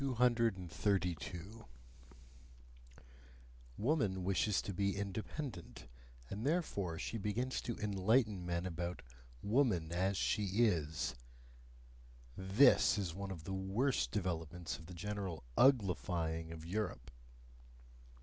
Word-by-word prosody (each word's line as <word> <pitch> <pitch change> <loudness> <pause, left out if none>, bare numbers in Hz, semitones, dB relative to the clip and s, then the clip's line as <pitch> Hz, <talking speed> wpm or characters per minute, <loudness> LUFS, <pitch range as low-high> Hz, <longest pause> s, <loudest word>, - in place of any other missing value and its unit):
232. 100 - 0 2.1
Woman 105 - +1
wishes 100 +2 +2
to 100 - -4
be 100 +1 0
independent, 110 +8 -5 0.4
and 100 - -5
therefore 120 - 0
she 115 - -3
begins 120 +6 -1
to 120 - -4
enlighten 105 0 +2
men 85 0 -2
about 85 0 -4 0.4
"woman 105 - +2
as 95 +3 +1
she 105 +1 +1 0.2
is" 80 - 0 1.2
THIS 100 +7 +5
is 95 -5 -2
one 100 +2 -5
of 85 -4 -6
the 95 - -4
worst 100 +8 +1
developments 85 -4 -3
of 80 - -12
the 90 - -9
general 95 -4 -4
UGLIFYING 90 -9 +2
of 80 -1 -8
Europe. 95 - -3
95 Hz, 100 wpm, -36 LUFS, 85-110 Hz, 2.1 s, THIS